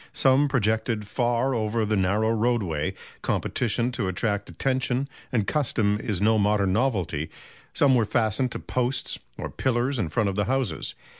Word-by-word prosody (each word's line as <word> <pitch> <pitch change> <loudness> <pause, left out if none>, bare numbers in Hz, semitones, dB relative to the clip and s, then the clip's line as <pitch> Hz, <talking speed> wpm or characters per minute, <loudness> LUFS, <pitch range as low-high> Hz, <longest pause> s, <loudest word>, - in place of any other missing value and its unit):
Some 135 +2 +4
projected 110 -3 0
far 120 +4 0
over 110 -1 0
the 105 +1 +1
narrow 105 +4 +2
roadway 110 -9 0 0.3
competition 120 0 0
to 120 - -2
attract 100 +2 -1
attention 130 0 0 0.2
and 115 -5 +1
custom 110 -8 +1
is 105 -5 -2
no 110 +2 +3
modern 100 -2 +2
novelty 95 - 0 0.4
some 140 -2 +4
were 120 -3 +3
fastened 115 +3 +1
to - - -4
posts 125 +1 -1 0.2
or - - -5
pillars 130 +1 0
in 90 -7 -1
front 110 +2 +1
of 95 - -3
the 105 0 +1
houses. 130 -10 -1
115 Hz, 155 wpm, -25 LUFS, 105-125 Hz, 0.4 s, Some